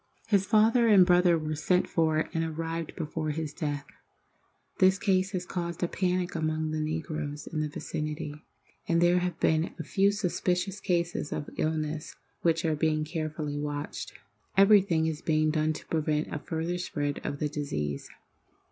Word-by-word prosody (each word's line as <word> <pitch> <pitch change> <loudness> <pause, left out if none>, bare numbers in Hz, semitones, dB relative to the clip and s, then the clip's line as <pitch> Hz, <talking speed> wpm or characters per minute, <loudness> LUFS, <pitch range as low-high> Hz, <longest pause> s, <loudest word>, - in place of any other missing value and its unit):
His 200 -3 +3
father 230 +2 +5
and 200 -4 +7
brother 175 -1 +5
were 155 -1 -3
sent 180 +4 +1
for 160 -1 +1
and 165 - 0
arrived 165 0 -4
before 155 -1 -3
his 155 0 -3
death. 145 -4 -3 0.9
This 190 +1 +5
case 190 -2 +2
has 180 -1 -2
caused 170 -1 -3
a - - +2
panic 180 0 -1
among 155 -1 -1
the 155 - -2
negroes 155 -1 -3
in 155 - -4
the 155 - -1
vicinity, 150 0 -5 0.4
and 170 0 +3
there 175 +1 +4
have 180 -2 -3
been 160 +2 +1
a 165 - -4
few 195 +6 +3
suspicious 190 -1 -1
cases 170 -5 -1
of 145 - -4
illness 155 -1 -2 0.3
which 165 -1 +2
are 160 -1 +2
being 155 0 +1
carefully 155 -2 -3
watched. 145 0 -4 0.4
Everything 195 -5 +5
is 160 0 -2
being 155 -2 +2
done 155 0 +1
to - - -9
prevent 155 -1 -1
a 155 - -2
further 165 +3 -3
spread 145 -5 -2
of 145 - -3
the 150 - 0
disease. 75 - -3
160 Hz, 165 wpm, -29 LUFS, 155-180 Hz, 0.9 s, and